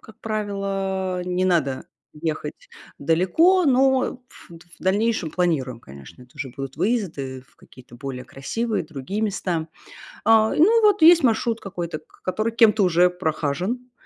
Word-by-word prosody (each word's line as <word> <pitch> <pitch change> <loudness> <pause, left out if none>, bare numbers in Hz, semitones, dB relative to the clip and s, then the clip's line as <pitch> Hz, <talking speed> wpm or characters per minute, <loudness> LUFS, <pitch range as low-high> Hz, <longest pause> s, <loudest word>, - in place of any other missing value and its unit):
Как 220 0 -16
правило, 195 -3 -2
не 180 0 -1
надо 155 -8 0 0.3
ехать 160 - -5 0.3
далеко, 320 - +3
но 265 -1 +2
в - - -17
в - - -12 0.2
дальнейшем 205 -2 0
планируем, 145 -10 -1
конечно, 70 - -14
это 125 0 -20
уже 135 - -5
будут 135 +1 -7
выезды 155 - -2
в - - -29
какие-то 125 -2 -17
более 130 0 -7
красивые 220 - -3
другие 155 +6 -5
места. 180 -6 -2 0.6
А, 220 -1 +4
и - - -2
ну 450 +8 +5
вот 410 -5 +4
есть 335 -1 +8
маршрут 230 -1 +1
какой-то, 175 -5 -5
к - - -26
который 215 +5 -1
кем-то 220 -2 +4
уже 180 0 +4
прохажен. 180 - -3
185 Hz, 145 wpm, -23 LUFS, 155-225 Hz, 0.6 s, есть